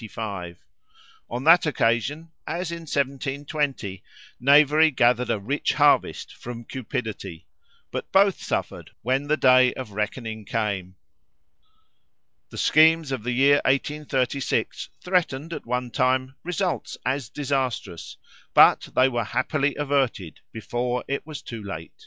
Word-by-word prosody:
On 120 +2 -4
that 165 +2 +6
occasion, 145 +5 0 0.2
as 170 +1 -3
in 170 - -5
1720, 135 -6 -2 0.4
knavery 150 +4 +5
gathered 125 -3 +2
a - - +1
rich 135 +9 -1
harvest - - +2
from 120 -1 -8
cupidity, 110 -9 -6 0.5
but - - -5
both 195 0 +4
suffered - - -3
when 130 +4 0
the 155 +1 +2
day 130 -2 +5
of 125 -5 -7
reckoning 110 +2 -4
came. 100 -4 -3 1.5
The - - -10
schemes 160 -1 +4
of 130 -4 -2
the 125 +3 -3
year 140 +3 +5
1836 140 -1 -1
threatened, 170 -4 0
at 150 - -7
one 125 0 -2
time, 130 +1 +1
results 180 +1 -2
as 130 -3 -1
disastrous; 130 - -3 0.4
but - - +6
they 130 - +5
were 120 -3 -1
happily 140 +5 -1
averted 135 - -1
before 120 +2 -3
it 140 +2 -3
was 155 -3 -8
too 115 -2 -7
late. 80 -4 -7
130 Hz, 120 wpm, -24 LUFS, 120-145 Hz, 1.5 s, that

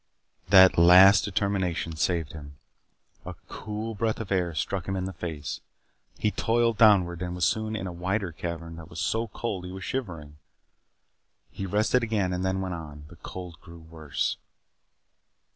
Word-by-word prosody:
That 95 -2 +7
last 90 +4 +8
determination 95 -5 -1
saved 80 -1 -1
him. 70 -2 -11 0.7
A - - -8
cool 110 +1 -5
breath 110 +1 -1
of 110 -3 -6
air 90 -4 0
struck 95 +3 -3
him 95 - -2
in 95 -1 -2
the 95 - -5
face. 80 -6 -5 0.6
He 105 - 0
toiled 115 0 +1
downward 90 -6 +4
and 90 0 -4
was 90 - +1
soon 110 0 -1
in 100 - -4
a 90 - -4
wider 95 +2 -2
cavern 85 0 -6
that 80 0 -11
was 80 -2 -8
so 115 +1 -1
cold 105 -3 -4
that - - -7
he 90 - -8
was 95 0 -7
shivering. 85 - -5 1.1
He 95 - -5
rested 110 +6 +2
again 105 -5 -1
and 90 +1 -2
then 95 0 -1
went 95 -1 -3
on. 75 -3 -9
The 85 - -13
cold 90 -2 -9
grew 85 -1 -13
worse. 80 -4 -3
90 Hz, 170 wpm, -27 LUFS, 85-105 Hz, 1.1 s, last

